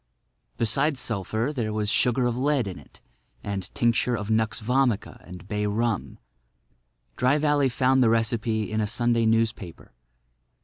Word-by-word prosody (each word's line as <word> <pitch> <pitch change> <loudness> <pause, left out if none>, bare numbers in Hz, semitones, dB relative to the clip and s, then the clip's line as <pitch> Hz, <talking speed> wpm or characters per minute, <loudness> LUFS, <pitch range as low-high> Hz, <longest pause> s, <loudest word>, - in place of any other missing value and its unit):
Besides 135 +5 +1
sulphur 115 +2 -2
there 115 -6 -2
was 105 -1 -2
sugar 125 +4 +2
of 120 -1 0
lead 135 -2 +1
in 95 - -6
it - - -19 0.4
and 100 -2 -5
tincture 120 +1 +1
of 105 0 -4
nux 110 0 +3
vomica 125 -1 0
and 90 0 -11
bay 105 0 -1
rum. 110 0 -2 1.0
Dry 130 +4 +3
Valley 145 -2 +2
found 130 +1 +2
the 120 - +4
recipe 115 -1 0
in 110 0 0
a 105 - 0
Sunday 120 0 +1
newspaper. 110 - -1
115 Hz, 145 wpm, -25 LUFS, 105-125 Hz, 1.0 s, the